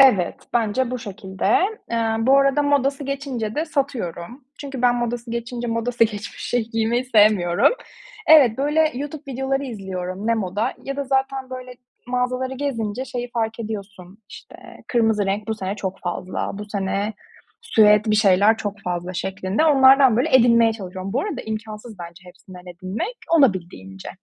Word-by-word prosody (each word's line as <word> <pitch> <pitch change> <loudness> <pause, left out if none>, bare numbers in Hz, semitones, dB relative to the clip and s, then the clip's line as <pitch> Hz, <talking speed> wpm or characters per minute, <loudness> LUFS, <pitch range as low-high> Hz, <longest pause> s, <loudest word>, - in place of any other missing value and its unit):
Evet, 210 -10 +5 0.2
bence 240 +2 0
bu 255 - -3
şekilde. 190 -3 -6 0.4
Eee, 225 -1 0
bu 265 +4 +5
arada 275 +1 +3
modası 280 0 +1
geçince 265 -6 -4
de 310 - 0
satıyorum. 255 - -4 0.2
Çünkü 275 -3 -6
ben 245 -1 +4
modası 240 0 -3
geçince 235 +1 -4
modası 230 +1 +1
geçmiş 210 -3 -6
şeyi 235 -2 -1
giymeyi 225 +2 0
sevmiyorum. 210 - +4 0.5
Evet, 275 -8 +6
böyle, 305 +3 +2
YouTube 290 +3 -6
videoları 270 +2 -1
izliyorum. 190 -4 -5
Ne 230 - +3
moda 210 +3 -2
ya 275 0 -5
da 280 - -2
zaten, 265 0 -1
böyle, 255 -1 -8 0.3
mağazaları 250 +1 -1
gezince 250 -4 -3
şeyi 245 -2 -5
fark 225 -1 -2
ediyorsun, 200 -3 -7
işte, - - -12 0.3
kırmızı 220 -4 +2
renk 205 +3 -2
bu 220 - 0
sene 195 -1 -4
çok 190 -2 -5
fazla, 180 +1 -4
bu 210 - -5
sene 200 +1 -2 0.5
süet 215 - +4
bir 210 - +3
şeyler 205 +1 +4
çok 205 -1 -5
fazla 180 0 -3
şeklinde 190 - -1
onlardan, 270 -4 +6
böyle, 260 +1 +4
edinmeye 230 -2 +5
çalışıyorum. 190 -2 -7
Bu 260 - +1
arada 405 +6 -4
imkânsız 215 0 -7 0.3
hepsinden 180 0 -14
edinmek. 185 - -5 0.2
Olabildiğince. 170 - 0
230 Hz, 150 wpm, -22 LUFS, 200-260 Hz, 0.5 s, Evet